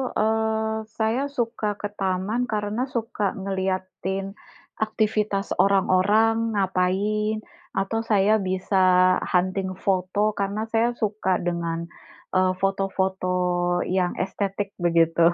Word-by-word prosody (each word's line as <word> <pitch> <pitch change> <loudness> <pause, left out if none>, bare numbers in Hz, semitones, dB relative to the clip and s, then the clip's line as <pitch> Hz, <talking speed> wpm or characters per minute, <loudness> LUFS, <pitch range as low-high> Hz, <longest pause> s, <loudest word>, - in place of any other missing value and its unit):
eee, 220 0 0
saya 225 +3 +1
suka 230 -6 -2
ke 205 0 -3
taman, 195 +6 0
karena 215 +4 -2
suka 220 -4 -1
ngelihatin 190 0 -3 0.5
aktivitas 215 -2 0
orang-orang 205 +4 +3
ngapain, 205 +3 0 0.3
atau 195 +4 0
saya 215 -1 +3
bisa 185 -1 +3
hunting 185 +1 0
foto, 195 +3 0
karena 200 +2 -1
saya 230 +1 +3
suka 210 -4 0
dengan, 170 -1 -2 0.5
eee, 185 0 +3
foto-foto 190 -1 0 0.6
yang 180 -1 0
estetik 195 +1 -3
begitu, 165 -1 +3
195 Hz, 100 wpm, -24 LUFS, 185-215 Hz, 0.6 s, orang-orang